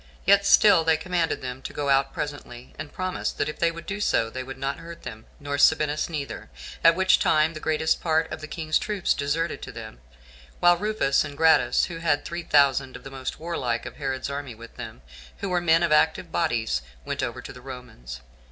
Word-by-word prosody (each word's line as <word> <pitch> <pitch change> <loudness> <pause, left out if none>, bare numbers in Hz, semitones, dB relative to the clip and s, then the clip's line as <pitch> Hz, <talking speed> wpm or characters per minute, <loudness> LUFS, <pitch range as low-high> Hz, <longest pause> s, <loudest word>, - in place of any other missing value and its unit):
Yet 200 +1 +5
still 205 -6 +6
they 160 -1 +3
commanded 170 -2 -1
them 125 0 -5
to - - -7
go 145 -1 -2
out 135 0 +3
presently, 135 -4 -7
and 155 -1 -6
promised, 185 0 -3
that - - 0
if 150 - -6
they 170 - +3
would 165 0 -8
do 195 +1 -4
so, 115 - +1
they 130 - -4
would 135 +1 -8
not 135 +1 -3
hurt 170 0 -10
them, 110 0 -9
nor 145 -1 -3
Sabinus 150 +1 +3
neither; 145 -4 -5 0.3
at 165 0 +7
which 190 +1 +4
time 155 +1 +3
the 155 - -7
greatest 160 +1 0
part 160 -1 +1
of 155 - -6
the 155 - -6
king's 155 -1 -1
troops 205 -4 0
deserted 155 +4 -2
to - - -7
them, - - -9 0.6
while 175 0 +6
Rufus 205 -8 +1
and 140 - -8
Gratus, 160 0 +4
who 170 - -7
had 155 -3 +1
three 170 +1 -4
thousand 140 -4 +3
of - - -10
the 135 - -9
most 130 -1 -5
warlike 130 -8 -2
of - - -8
Herod's 135 -2 -3
army 140 -3 -5
with 115 +1 -13
them, 65 - -9 0.3
who 200 - -4
were 180 -1 +1
men 165 0 +4
of 170 - +1
active 160 +3 +2
bodies, 120 - 0 0.2
went - - -3
over - - -3
to - - -9
the 125 - -12
Romans. 120 - -9
155 Hz, 215 wpm, -25 LUFS, 135-170 Hz, 0.6 s, at